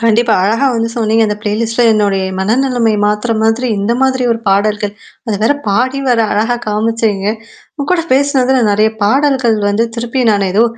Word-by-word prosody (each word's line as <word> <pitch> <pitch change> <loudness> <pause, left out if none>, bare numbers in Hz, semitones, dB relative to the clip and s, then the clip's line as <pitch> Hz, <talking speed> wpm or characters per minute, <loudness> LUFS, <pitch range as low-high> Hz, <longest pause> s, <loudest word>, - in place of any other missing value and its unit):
கண்டிப்பா. 230 0 +2
அழகா 225 +8 +1
வந்து 230 0 -1
சொன்னீங்க. 225 0 +1
அந்த 210 -1 -2
ப்ளேலிஸ்ட்ல 225 +3 -1
என்னுடைய 200 -3 0
மனநிலைமை 235 +3 +1
மாத்துற 210 +3 -1
மாதிரி 225 +3 +1
இந்த 200 +4 0
மாதிரி 260 -1 +1
ஒரு 230 - -3
பாடல்கள். 205 +1 0 0.3
அது 215 -3 -1
வேற 230 +6 +3
பாடி 255 +7 0
வேற 240 -2 +2
அழகா 225 +3 0
காமிச்சேங்க. 215 -2 -1 0.5
உங்க 285 -2 -4
கூட 335 -2 0
பேசினதுல 265 -2 +2
நறைய 215 +2 +2
பாடல்கள் 260 -1 +2
வந்து 220 +3 +1
திருப்பி 240 +2 -2
நானு 200 -2 +1
ஏதோ 220 +3 +4
225 Hz, 160 wpm, -13 LUFS, 210-250 Hz, 0.5 s, ஏதோ